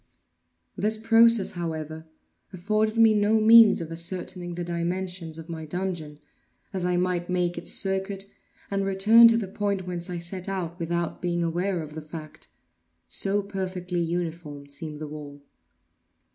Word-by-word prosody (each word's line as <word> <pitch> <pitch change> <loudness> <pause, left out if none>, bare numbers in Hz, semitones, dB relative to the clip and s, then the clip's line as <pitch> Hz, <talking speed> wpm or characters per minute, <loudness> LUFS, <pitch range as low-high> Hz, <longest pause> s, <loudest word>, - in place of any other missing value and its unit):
This 215 +2 +1
process, 225 -1 +4
however, 160 -2 -5 0.4
afforded 215 +4 -1
me 225 -1 +6
no 210 +1 +3
means 220 -2 +7
of 165 0 -6
ascertaining 175 +1 -1
the 175 - -4
dimensions 175 -1 -3
of 165 0 -9
my 165 -2 -6
dungeon; 165 -2 -4 0.6
as 185 -2 -3
I 180 0 +1
might 180 -1 -1
make 180 -1 0
its - - -3
circuit, 195 0 +1 0.5
and 195 0 0
return 210 +4 +6
to 230 0 +4
the 215 -4 -2
point 200 -1 -2
whence 175 -1 -5
I 175 - -4
set 180 +2 -4
out, 175 -3 -4
without 170 0 -3
being 175 -1 -1
aware 175 +1 -1
of 150 -1 -10
the 155 - -6
fact; 155 0 -10 0.6
so 200 +1 +2
perfectly 185 -2 -4
uniform 165 -4 -4
seemed 150 +1 -6
the 155 0 -6
wall. 145 -1 -9
180 Hz, 150 wpm, -26 LUFS, 165-195 Hz, 0.6 s, means